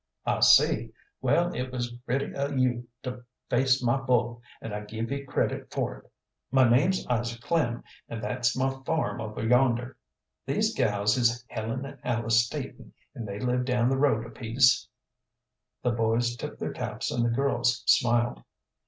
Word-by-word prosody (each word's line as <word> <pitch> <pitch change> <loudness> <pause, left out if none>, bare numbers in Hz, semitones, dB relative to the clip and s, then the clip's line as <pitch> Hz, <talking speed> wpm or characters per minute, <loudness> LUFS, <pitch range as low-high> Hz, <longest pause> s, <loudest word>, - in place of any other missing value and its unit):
"I - - +1
see. - - +5 0.3
Well, 175 +1 +2
it 125 0 -4
was 120 -1 -3
gritty 125 +3 -3
o' 140 0 -1
you 125 -3 0 0.2
to 125 -1 -6 0.3
face 130 +1 +3
my 120 +2 +3
bull, 120 -3 0 0.2
and 115 - -7
I 105 - -2
give 110 +3 -5
ye 140 0 -2
credit 130 - -2
for - - -2
it. - - -24 0.4
My 130 -1 +5
name's 150 +11 +3
Isaac 120 -1 -1
Klem, 125 -9 0 0.3
and 115 - -5
thet's 120 +1 -1
my 135 +1 +1
farm 160 -5 -1
over 110 0 -4
yonder. 125 0 +2 0.5
These - - +1
gals 105 +1 +2
is 120 0 +1
Helen 115 +4 -4
and 135 - -10
Alice 115 -1 +2
Staton, 115 - -7 0.2
and 120 -6 -6
they 100 0 -5
live 125 +1 0
down 125 -1 +1
the 135 - +1
road 115 -6 +2
a 115 - -10
piece." 120 +2 +3 1.0
The 125 - +2
boys 115 +1 +1
tipped - - -7
their - - -3
caps - - -4
and 120 - 0
the 120 - +2
girls 130 -1 +1
smiled. 120 0 +3
120 Hz, 170 wpm, -27 LUFS, 115-130 Hz, 1.0 s, see